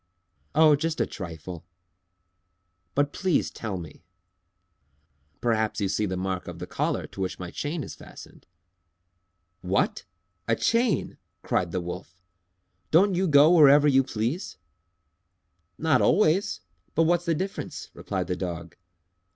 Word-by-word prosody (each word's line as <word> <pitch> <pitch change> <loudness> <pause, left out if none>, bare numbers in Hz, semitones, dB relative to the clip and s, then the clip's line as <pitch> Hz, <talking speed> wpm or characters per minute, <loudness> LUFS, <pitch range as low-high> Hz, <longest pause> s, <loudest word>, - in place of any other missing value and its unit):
"Oh, 155 -1 +6
just 160 +2 -2
a - - +3
trifle!" 85 -2 -8 1.3
"But 145 0 +1
please 185 -4 0
tell 105 -4 -5
me." 85 -1 -10 1.4
"Perhaps 110 -2 0
you 100 - +1
see 105 +2 0
the 95 -1 -3
mark 95 0 -3
of - - -7
the - - -6
collar - - -2
to 95 - -9
which 95 -1 -2
my 90 -1 -7
chain 150 +1 -3
is - - -8
fastened." - - -14 1.1
"What! 95 +2 0 0.4
A 115 - +3
chain!" 230 - +1 0.2
cried 85 -2 0
the 90 - -2
Wolf. 90 +1 -8 0.7
"Don't 190 +5 +4
you 185 +1 +1
go 150 +1 +6
wherever 145 -2 +7
you 135 -2 +5
please?" 125 - -3 1.2
"Not 155 -5 +2
always! 190 - +2 0.3
But 165 - +4
what's 175 +1 +2
the 165 -2 +1
difference?" 190 +5 -5
replied - - -3
the 90 - -2
Dog. 85 -2 -6
130 Hz, 135 wpm, -26 LUFS, -, 1.4 s, wherever